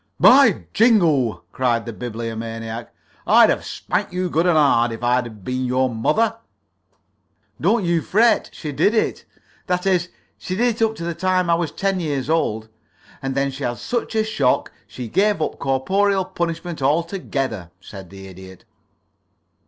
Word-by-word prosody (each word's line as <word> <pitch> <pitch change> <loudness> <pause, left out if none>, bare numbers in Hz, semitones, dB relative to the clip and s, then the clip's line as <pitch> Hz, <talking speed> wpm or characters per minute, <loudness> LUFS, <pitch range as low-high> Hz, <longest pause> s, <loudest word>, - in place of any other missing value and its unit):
"By 275 +1 +6
jingo!" 170 - +3
cried 120 -3 0
the 115 - -6
Bibliomaniac. 115 0 -6 0.4
"I'd - - +6
have - - -2
spanked - - -3
you 180 0 -2
good 165 +3 +2
and 170 -3 +3
hard 120 -6 +3
if 115 +1 -7
I'd 120 -4 -1
been 130 +3 -2
your 130 0 0
mother." 225 - +1 1.2
"Don't 225 -4 +2
you 170 -1 +1
fret 220 +5 +2
she 150 - -6
did 205 +10 +2
it; 220 - -1 0.4
that 180 0 -1
is, 180 -2 +1 0.3
she 185 - -4
did 230 +1 0
up 220 0 +2
to 170 - -7
the 170 0 -2
time 185 0 +1
I - - +5
was 165 -1 -1
ten 195 -1 -1
years 145 -4 -2
old, 110 -9 0 0.5
and 135 0 -3
then 140 0 0
she 135 +1 -7
had 120 -1 -2
such 240 -2 -3
a 220 - +3
shock 145 -13 0 0.2
she 125 -2 -7
gave 205 - +1
up 155 - -3
corporeal 190 +9 +1
punishment 170 -2 -4
altogether," 135 - -1
said 95 -1 -11
the 95 0 -11
Idiot. 95 0 -13
150 Hz, 160 wpm, -21 LUFS, 120-185 Hz, 1.2 s, By